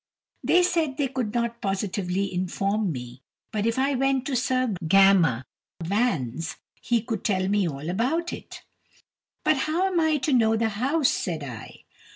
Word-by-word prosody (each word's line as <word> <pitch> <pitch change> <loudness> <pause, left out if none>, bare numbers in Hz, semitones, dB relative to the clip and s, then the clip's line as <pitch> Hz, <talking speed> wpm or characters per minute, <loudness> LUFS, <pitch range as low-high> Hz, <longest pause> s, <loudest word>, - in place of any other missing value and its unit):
They 360 +1 +4
said 325 -6 0
they 280 -3 0
could 250 -5 -2
not 235 0 -2
positively 195 -1 -2
inform 195 +2 -1
me, 125 -2 -7 0.3
but 215 0 -1
if 230 - 0
I 275 +2 +2
went 270 0 +1
to 275 - -2
Sir 255 -2 +1
Gammer 175 -9 +5 0.3
Vans 165 - -1 0.3
he 235 -2 +1
could 225 -4 -4
tell 185 -3 +1
me 200 -2 +2
all 140 +1 -6
about 260 - 0
it. - - -9 0.8
"But 310 - +3
how 345 +4 +1
am 375 -3 +1
I 315 -2 +3
to 280 +1 0
know 225 -3 +4
the 225 0 +1
house?" 265 +8 +1
said 165 -5 -3
I. 120 -5 -9
220 Hz, 165 wpm, -25 LUFS, 185-265 Hz, 0.8 s, Gammer